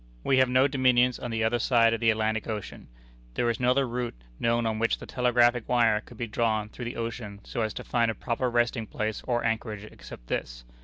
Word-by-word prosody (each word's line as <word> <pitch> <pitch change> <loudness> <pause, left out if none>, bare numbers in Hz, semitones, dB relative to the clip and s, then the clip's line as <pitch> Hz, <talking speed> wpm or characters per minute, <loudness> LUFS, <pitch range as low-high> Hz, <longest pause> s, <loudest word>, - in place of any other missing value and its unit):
We 135 -1 +3
have 130 -1 +4
no 130 +2 +4
dominions 125 -2 +3
on 120 - -5
the 115 -1 -1
other 115 +2 +1
side 115 -1 +4
of 115 - -1
the 115 0 +3
Atlantic 110 0 0
Ocean. 105 -5 -6 0.5
There 120 - +1
is 115 - -5
no 125 0 +2
other 135 +1 +3
route 120 0 -3 0.2
known 115 0 +1
on 110 -1 -1
which 115 0 +1
the - - -10
telegraphic 120 -1 +2
wire 115 -4 +3
could 120 - -15
be 120 - -2
drawn 110 -1 0
through 120 - -8
the 120 - -5
ocean 115 -3 -5
so 120 - -4
as 110 -1 -2
to - - -5
find 115 -1 +1
a 110 - -2
proper 125 +2 -1
resting 120 -1 0
place 110 0 -3
or 120 -1 0
anchorage 110 -2 -2
except - - -12
this. - - -4
115 Hz, 225 wpm, -27 LUFS, 110-125 Hz, 0.5 s, have